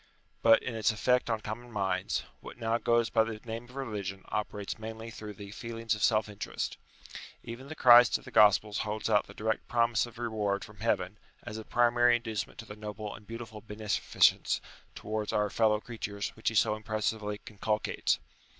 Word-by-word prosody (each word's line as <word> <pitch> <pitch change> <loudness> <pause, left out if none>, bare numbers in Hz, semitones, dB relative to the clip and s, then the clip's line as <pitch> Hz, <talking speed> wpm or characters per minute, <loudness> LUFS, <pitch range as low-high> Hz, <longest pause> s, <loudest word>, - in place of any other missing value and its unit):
But 115 0 +6
in 130 - -3
its 110 -2 +2
effect 125 +4 +2
on 110 -2 0
common 120 +3 -6
minds, 95 -3 -1 0.2
what - - -10
now 115 0 0
goes 115 -1 +2
by 110 - +4
the 110 -1 -5
name 115 +1 -5
of 125 +2 -16
religion 105 -7 -4
operates 105 0 -3
mainly 110 +1 -7
through 105 -1 -8
the 100 0 -9
feelings 115 0 -3
of 105 - -4
self 110 0 +3
interest. 105 -1 -4 0.7
Even 120 +4 -8
the 155 - -7
Christ 120 -3 +8
of - - -17
the - - -10
Gospels 105 0 +5
holds 110 +1 -2
out 105 -1 +3
the 100 - -13
direct 110 0 -1
promise 115 0 +2
of 120 -1 -14
reward 105 -5 -1
from 105 -1 -15
heaven 105 -3 0 0.2
as 110 +1 -6
a - - -7
primary 120 +1 +4
inducement 110 -3 -3
to 115 - -8
the 105 - -9
noble 105 0 -6
and 105 +1 -13
beautiful 115 -2 -7
beneficence 105 -1 +2 0.4
towards 110 0 -3
our 105 -1 +1
fellow 110 -2 +3
creatures 105 -3 -4
which 110 - -2
he 110 - -7
so 105 - +4
impressively 110 -1 -2
inculcates. 110 0 0
110 Hz, 185 wpm, -30 LUFS, 105-115 Hz, 0.7 s, Christ